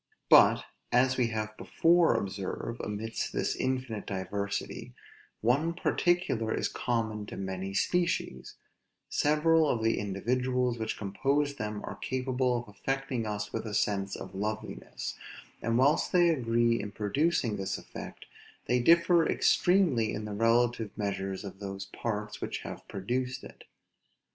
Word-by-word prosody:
But, - - +7 0.3
as 130 +1 +4
we 125 -2 +2
have 110 -1 -3
before 170 -5 +3
observed, 100 +3 -3
amidst 110 +2 -3
this - - 0
infinite 130 -5 -2
diversity, 100 +1 -4 0.5
one 145 +9 +2
particular 175 -11 +1
is - - 0
common 110 -4 -2
to - - -7
many 95 0 -4
species: 170 - 0 0.5
several 155 +1 +3
of 115 -4 0
the 115 - +2
individuals 125 +5 0
which 110 0 -2
compose 140 +8 0
them 105 -1 -4
are - - -6
capable 130 -1 0
of 120 - -6
affecting 130 +2 -3
us 105 0 -4
with 115 0 -3
a 105 - -3
sense 100 -1 0
of 95 - -8
loveliness: 105 +3 -4 0.4
and 115 +1 +1
whilst 140 +4 +3
they 175 -1 +5
agree 120 -5 +2
in 105 - -6
producing 115 +3 0
this 95 - -2
effect, - - -9 0.4
they 125 - +2
differ 170 +5 +5
extremely 170 - +3
in 105 - -4
the 105 - -5
relative 115 +1 +2
measures 95 -1 -3
of 95 -1 -8
those 95 -1 -5
parts 105 +1 -4
which - - -3
have - - -8
produced 125 +6 -3
it. - - -12
115 Hz, 140 wpm, -30 LUFS, 105-130 Hz, 0.5 s, But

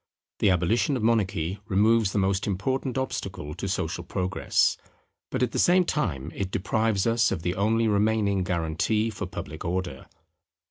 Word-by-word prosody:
The 105 - +4
abolition 105 - +2
of 115 - -4
monarchy 100 -5 +1
removes 110 +1 +3
the - - -2
most 100 +1 +1
important 130 +7 -1
obstacle 95 - -4
to - - -5
social - - -2
Progress: 95 +1 +1 0.5
but - - -1
at - - 0
the - - -2
same 180 +1 +4
time 80 - -2
it 95 -2 -3
deprives 100 +2 0
us 115 0 +3
of 80 - -3
the 90 - 0
only 110 +4 +1
remaining 105 -2 +2
guarantee 90 +6 0
for 100 -3 -5
public 80 -3 -7
Order. 90 -5 -3
100 Hz, 155 wpm, -26 LUFS, 90-115 Hz, 0.5 s, The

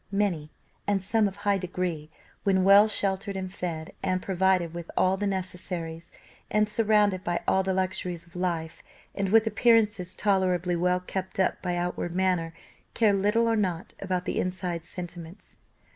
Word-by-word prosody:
Many, 195 -7 0 0.4
and 200 -2 +1
some 220 +2 +2
of 195 - -6
high 200 -1 +1
degree, 175 -4 -3 0.3
when 190 -2 +3
well 200 +2 +7
sheltered 200 -1 -2
and 185 -1 -4
fed, 165 -4 -5
and 185 -1 0
provided 185 -2 +1
with 170 -1 -7
all 185 +1 +4
the 205 +1 -2
necessaries, 180 -3 -4 0.4
and 210 0 +2
surrounded 210 -3 +2
by 175 0 -1
all 190 - +4
the 190 0 -1
luxuries 185 -2 -2
of 170 - -22
life, 170 -3 -2 0.3
and 195 -1 -1
with 225 +2 +5
appearances 215 -4 +2
tolerably 185 -3 +1
well 180 +1 +1
kept 190 +1 -5
up 190 - +1
by 180 -1 -1
outward 175 -1 -2
manner, 180 -3 +1 0.4
care 220 -3 +4
little 210 +4 +2
or 230 - +2
nought 185 -5 -2
about 185 -2 -2
the - - -1
inside 180 -2 -3
sentiments. 175 0 -7
185 Hz, 160 wpm, -27 LUFS, 175-200 Hz, 0.4 s, well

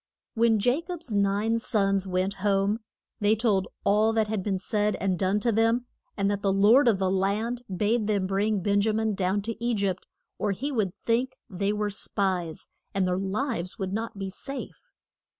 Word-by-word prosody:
When 225 -2 +3
Ja 245 +8 +2
cob's 340 -6 -7
nine 205 +3 +2
sons 195 -4 +1
went 185 +1 0
home 200 +1 +2 0.4
they 210 0 +3
told 205 -4 +1 0.2
all 215 +2 +3
that 220 -1 +1
had 215 -2 -1
been 195 0 -1
said 210 +2 0
and 190 -2 -1
done 195 +2 +2
to 235 - +2
them, 225 +3 +2 0.3
and 200 -1 +1
that 200 -1 -2
the 200 -2 +2
lord 215 +8 +5
of 220 -4 +4
the 190 -1 0
land 210 +6 0
bade 210 +4 +1
them 200 -3 +1
bring 200 +2 0
Ben 200 +2 +2
ja 215 +1 +1
min 220 0 0
down 190 +1 0
to 230 +2 -5
E 240 -1 +1
gypt 195 -3 -1 0.3
or 205 -1 +1
he 275 +9 -3
would 210 -8 -1
think 245 +3 +1 0.2
they 200 +2 0
were 210 0 -1
spies, 185 -5 -2 0.3
and 190 -2 +2
their 180 0 0
lives 195 -1 -2
would 190 -3 -3
not 225 0 -3
be 195 -1 -4
safe. 275 +8 -6
205 Hz, 190 wpm, -27 LUFS, 195-225 Hz, 0.4 s, lord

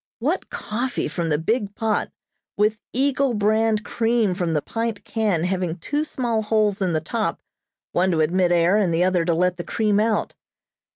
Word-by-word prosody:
What - - -1
coffee 240 +4 -3
from 170 -2 -3
the 150 - +2
big 205 +5 -1
pot, 220 -2 -1 0.5
with 210 +1 +2
Eagle 270 -1 +1
brand 215 +1 +2
cream 225 -4 +1
from 175 -3 -1
the 150 - +1
pint 225 -2 -3
can 210 -8 0
having 180 -2 -1
two 290 - -2
small 240 -7 -1
holes 210 -2 +1
in 185 -3 +1
the 155 - 0
top, 215 +8 -2 0.5
one 185 +2 +2
to 165 -3 +2
admit 175 +3 +2
air 175 +3 +4
and 195 -5 +2
the 165 +2 +2
other 180 -2 +2
to 170 -1 +2
let 180 +1 +1
the 175 - -4
cream 210 0 +1
out. 215 0 0
205 Hz, 180 wpm, -23 LUFS, 175-225 Hz, 0.5 s, air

